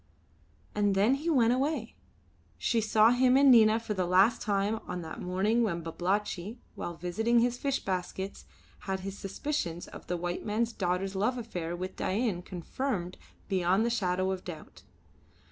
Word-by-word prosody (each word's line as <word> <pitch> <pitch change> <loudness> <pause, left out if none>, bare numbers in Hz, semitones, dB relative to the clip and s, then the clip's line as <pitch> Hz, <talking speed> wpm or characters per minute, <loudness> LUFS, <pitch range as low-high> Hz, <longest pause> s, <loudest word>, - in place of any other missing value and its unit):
And 205 -1 +1
then 205 +6 +4
he 300 +5 -2
went 245 -6 +4
away. 265 -2 -1 0.6
She 230 -2 +1
saw 220 +1 +5
him 250 +1 +4
and 275 -1 +7
Nina 220 -2 +6
for 225 -2 -4
the 185 -3 -1
last 190 +6 +4
time 205 +1 0
on 180 -1 -4
that 160 - -7
morning 195 +6 +1
when 170 -7 -1
Babalatchi, 190 +5 -2 0.2
while 175 - -5
visiting 215 +8 0
his 245 +1 +2
fish 275 -1 -1
baskets, 190 +1 -4 0.4
had 190 0 -1
his 195 +1 -5
suspicions 195 - -3
of - - -11
the 180 - -1
white 175 +1 -3
man's 225 +2 -1
daughter's 185 0 -1
love 215 +6 0
affair 175 -8 -4
with 185 +1 -5
Dain 200 -3 0
confirmed 185 +1 -4 0.3
beyond 190 +2 +2
the 235 - +1
shadow 185 -4 0
of 185 -1 -4
doubt. 160 -4 -9
200 Hz, 160 wpm, -30 LUFS, 180-235 Hz, 0.6 s, and